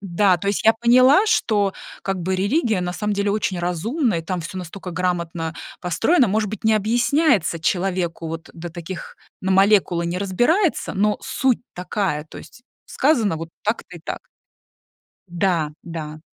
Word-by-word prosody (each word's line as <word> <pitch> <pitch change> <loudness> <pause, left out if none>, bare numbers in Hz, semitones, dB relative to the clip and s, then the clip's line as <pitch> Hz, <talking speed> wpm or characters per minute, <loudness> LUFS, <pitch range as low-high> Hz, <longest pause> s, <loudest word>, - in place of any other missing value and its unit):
да, 190 -1 +2
то 200 +4 -3
есть 200 - -1
я 225 - +7
поняла, 255 - +6
что 205 - +2 0.3
как 195 -2 -2
бы 190 +2 -1
религия 210 - +1
на 180 0 -2
самом 210 +3 -2
деле 200 0 0
очень 195 -4 -1
разумна, 215 - 0
и 165 - -1
там 180 +1 -3
всё 175 +3 -6
настолько 180 +1 -7
грамотно 170 -2 -2 0.3
построено, 240 - +2
может 210 +1 0
быть, 215 +1 -7
не 220 0 +4
объясняется 225 - +2
человеку, 175 -1 -1
вот, 165 +1 -6
э, - - -17
до 170 +1 -7
таких, 170 +2 -8 0.3
на 190 0 0
молекулы 190 -3 +3
не 175 +2 -2
разбирается, 245 - +1
но 210 +2 +1
суть 260 -3 +1
такая, 180 -4 -2
то - - -11
есть 240 - -14 0.2
сказано 235 - +1
вот 165 +1 -7
так-то 210 -4 -3
и - - -12
так. - - -4 1.1
Да, 170 -3 0
да. 155 -2 -6
190 Hz, 165 wpm, -22 LUFS, 170-215 Hz, 1.1 s, я